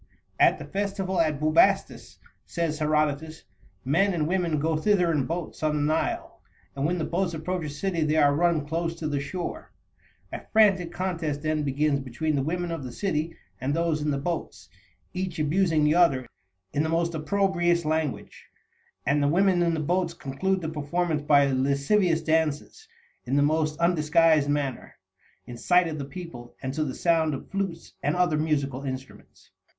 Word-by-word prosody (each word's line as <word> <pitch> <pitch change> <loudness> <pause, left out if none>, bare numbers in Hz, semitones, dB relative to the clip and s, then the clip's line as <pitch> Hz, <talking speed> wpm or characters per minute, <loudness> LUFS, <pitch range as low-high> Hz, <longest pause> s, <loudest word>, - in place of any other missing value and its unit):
"At - - +5
the - - -8
festival 195 -2 -1
at 155 -3 0
Bubastis," 155 +1 +2 0.3
says 165 -2 -2
Herodotus, 155 +1 0 0.4
"men 180 +8 +2
and 155 -2 0
women 175 -3 0
go 160 +2 0
thither 180 +1 +2
in 145 -5 0
boats 170 0 -5
on 155 -1 +1
the 145 - 0
Nile, 155 +2 -1 0.3
and 140 +1 0
when 180 +2 0
the 165 - -2
boats 175 -1 -1
approach 175 +1 -3
a - - -4
city 170 +4 -2
they 155 0 +1
are 145 -2 +4
run 165 -1 +1
close 165 +2 -2
to 165 -2 -4
the 145 -2 -1
shore. 175 +5 -5 0.6
A - - -4
frantic 195 -6 +4
contest 165 -6 -3
then 155 0 0
begins 145 0 +1
between 140 +4 -2
the 140 - +1
women 175 +4 -2
of 165 -4 -4
the 125 - -6
city 165 - -2 0.2
and 135 +4 -1
those 165 -2 0
in 150 - -1
the 140 - 0
boats, 165 +4 -5 0.4
each 185 -2 -3
abusing 160 +1 +2
the 150 0 +4
other 160 -7 +3 0.5
in 145 - +1
the 160 - 0
most 170 +1 0
opprobrious 175 +1 +1
language, 155 -2 -3 0.6
and 140 +3 +2
the 145 - +2
women 180 +3 +3
in 170 -1 +2
the - - -2
boats 170 +2 0
conclude 185 +7 -2
the 160 - -3
performance 155 +1 -1
by 145 -1 +4
lascivious 140 +6 +1
dances, 160 - -1 0.4
in 130 +2 -1
the 145 - +4
most 155 0 +1
undisguised 160 -3 +3
manner, 145 -4 -2 0.5
in 120 - -9
sight 180 +8 +3
of 155 -2 -5
the 140 - -4
people, 140 -7 -9
and 130 0 -3
to 155 - -1
the 130 -4 -4
sound 160 -3 +2
of - - -10
flutes 195 -4 -4
and 145 +2 0
other 175 -4 +2
musical 140 -4 -1
instruments." 130 -1 -9
160 Hz, 175 wpm, -26 LUFS, 145-175 Hz, 0.6 s, At